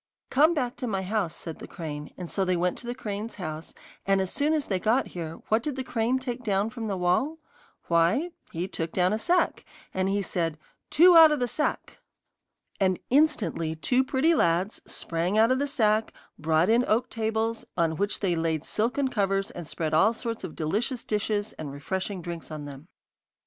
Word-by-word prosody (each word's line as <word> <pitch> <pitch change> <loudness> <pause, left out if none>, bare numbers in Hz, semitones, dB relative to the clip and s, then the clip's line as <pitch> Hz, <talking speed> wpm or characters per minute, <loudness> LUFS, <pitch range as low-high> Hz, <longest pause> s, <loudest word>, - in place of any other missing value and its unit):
'Come 310 +5 +5
back 255 -2 -2
to 250 - -3
my 195 -4 -1
house,' 190 -4 -1
said 165 -2 -7
the - - -8
crane, 150 -3 -6
and 180 - -6
so 195 - -1
they 185 -1 +1
went 180 +1 +1
to 240 - -11
the 240 - -3
crane's 215 -2 -5
house, 155 -4 -6 0.3
and 195 0 +2
as 190 -1 -1
soon 290 +2 +1
as 305 -2 0
they 190 -2 -1
got 230 +7 +1
there, 165 -2 -5
what 220 +2 +3
did 290 +2 -3
the 265 - -3
crane 240 +1 0
take 250 -1 -4
down 205 0 0
from 230 -2 -5
the 195 -2 -2
wall? 185 - +1 0.5
Why, 175 - +2 0.2
he 170 +3 -3
took 165 -4 -4
down 185 +1 +2
a 215 - -1
sack, 355 +9 +1 0.3
and 190 0 0
he 200 0 0
said: 165 -4 -1 0.3
'Two 350 +2 +7
out 325 -2 +9
of 300 - +1
the 245 - +1
sack!' 300 +6 -2 0.8
And 185 -2 +2
instantly 210 - +2
two 250 +11 +2
pretty 270 +5 +2
lads 180 - +1
sprang 170 +5 -1
out 225 +3 +5
of 260 - +2
the 285 - 0
sack, 220 -5 +2 0.3
brought 160 +2 +2
in 230 +3 +4
oak 225 +3 +2
tables, 225 0 -1
on 165 -2 +2
which 200 +1 -1
they 185 -4 +1
laid 165 -2 -1
silken 250 +6 0
covers, 195 -5 0
and 175 -3 -8
spread 155 -1 -3
all 195 +9 +5
sorts 230 0 -5
of 160 - -6
delicious 220 - -1
dishes 210 0 -1
and 150 -3 -5
refreshing 185 +6 -4
drinks 170 -1 -6
on 155 -2 -6
them. 145 +2 -10
205 Hz, 200 wpm, -27 LUFS, 170-245 Hz, 0.8 s, out